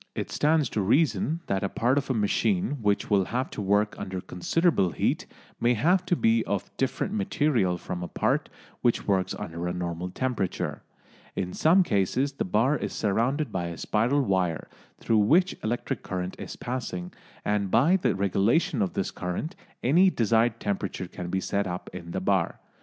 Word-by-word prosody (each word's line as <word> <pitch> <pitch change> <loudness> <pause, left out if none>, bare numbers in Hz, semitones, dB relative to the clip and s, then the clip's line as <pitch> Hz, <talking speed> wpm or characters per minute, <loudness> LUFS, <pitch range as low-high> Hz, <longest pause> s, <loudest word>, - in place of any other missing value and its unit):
It - - -4
stands 150 -1 +2
to 110 - -1
reason 155 - +2
that 95 -1 -1
a 100 - 0
part 125 +4 +2
of 140 - -7
a 130 - +1
machine 145 - +1
which 105 -1 0
will 100 -2 +4
have 125 +6 -2
to - - -5
work 105 +2 +2
under 95 0 -4
considerable 95 - +1
heat - - 0 0.3
may 120 +1 +3
have 180 - +2
to 180 - +3
be 115 -6 +3
of 100 -2 -3
different 135 +9 -1
material 145 - +1
from 90 0 -5
a 90 - -3
part - - 0 0.3
which 120 - +1
works 95 -2 +1
under 85 +1 -5
a 90 - -1
normal 90 0 -3
temperature. 115 -3 -2 0.5
In 90 -2 -3
some 180 +4 +5
cases 125 - +1
the 140 - -3
bar 110 +10 +2
is - - -4
surrounded 120 +8 0
by 90 -2 -2
a 85 -1 -5
spiral 125 +7 +1
wire 95 -7 0 0.3
through 110 -1 +2
which 170 - +4
electric 120 +3 -2
current 90 -1 -4
is - - -6
passing, 100 -8 -4 0.3
and 105 -1 0
by 140 - +4
the 180 - +1
regulation 110 - +2
of 95 - 0
this - - -2
current 90 - -4 0.3
any 175 +10 +5
desired 115 - +2
temperature 95 -2 -3
can 90 0 -7
be 95 - 0
set 100 +1 -1
up 90 0 -5
in 85 -2 -8
the 95 - -2
bar. 95 -2 0
105 Hz, 180 wpm, -27 LUFS, 95-140 Hz, 0.5 s, some